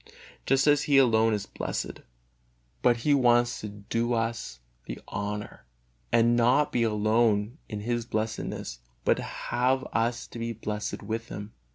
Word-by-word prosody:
Just 135 Hz, +1 st, +4 dB
as 145 Hz, -1 st, +5 dB
He 140 Hz, -, +6 dB
alone 115 Hz, -4 st, +5 dB
is 105 Hz, -2 st, -1 dB
blessed, -, -, -4 dB, 0.8 s
but 120 Hz, -1 st, +4 dB
He 150 Hz, -, +5 dB
wants 120 Hz, -3 st, +3 dB
to 105 Hz, -, -4 dB
do 115 Hz, +4 st, -2 dB
us 115 Hz, -, -2 dB, 0.3 s
the -, -, -5 dB
honor 100 Hz, -7 st, -5 dB, 0.5 s
and 115 Hz, +1 st, +4 dB
not 125 Hz, +5 st, +3 dB
be 120 Hz, -, +1 dB
alone 110 Hz, +2 st, +2 dB
in 105 Hz, -2 st, -4 dB
His 120 Hz, +2 st, -1 dB
blessedness, 110 Hz, -, -3 dB, 0.3 s
but -, -, +3 dB
have 130 Hz, +2 st, 0 dB
us 115 Hz, +1 st, 0 dB
to 120 Hz, -, -8 dB
be 115 Hz, 0 st, -2 dB
blessed 105 Hz, -1 st, -4 dB
with 115 Hz, +2 st, -3 dB
Him. 105 Hz, +1 st, -7 dB
115 Hz, 150 wpm, -28 LUFS, 105-120 Hz, 0.8 s, He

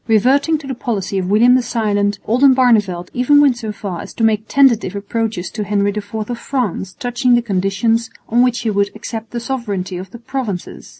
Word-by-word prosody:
Reverting 265 Hz, +8 st, +3 dB
to 295 Hz, -, -11 dB
the 270 Hz, -, -4 dB
policy 205 Hz, -5 st, -2 dB
of 185 Hz, 0 st, -3 dB
William 230 Hz, +5 st, +5 dB
the 255 Hz, -, +4 dB
Silent, 205 Hz, -4 st, 0 dB
Oldenbarneveldt 230 Hz, -8 st, +3 dB
even 255 Hz, +4 st, +4 dB
went 280 Hz, -4 st, +4 dB
so 220 Hz, -2 st, -4 dB
far 195 Hz, -4 st, -6 dB
as -, -, -10 dB
to 225 Hz, -, -2 dB
make 220 Hz, -1 st, +2 dB
tentative 235 Hz, -8 st, +3 dB
approaches 205 Hz, -2 st, -3 dB
to 215 Hz, -, -4 dB
Henry 205 Hz, 0 st, +1 dB
IV 210 Hz, +1 st, -5 dB
of 240 Hz, -1 st, -5 dB
France 220 Hz, -8 st, -3 dB
touching 245 Hz, -1 st, +1 dB
the 240 Hz, -, +3 dB
conditions 215 Hz, +3 st, 0 dB, 0.2 s
on 235 Hz, +2 st, +2 dB
which 245 Hz, -1 st, +2 dB
he 225 Hz, -, -1 dB
would 200 Hz, 0 st, +1 dB
accept 225 Hz, -1 st, -6 dB
the 240 Hz, -, -4 dB
sovereignty 210 Hz, -8 st, -4 dB
of 185 Hz, +1 st, -7 dB
the 235 Hz, -, -10 dB
Provinces. 235 Hz, -6 st, -5 dB
225 Hz, 195 wpm, -17 LUFS, 200-245 Hz, 0.2 s, William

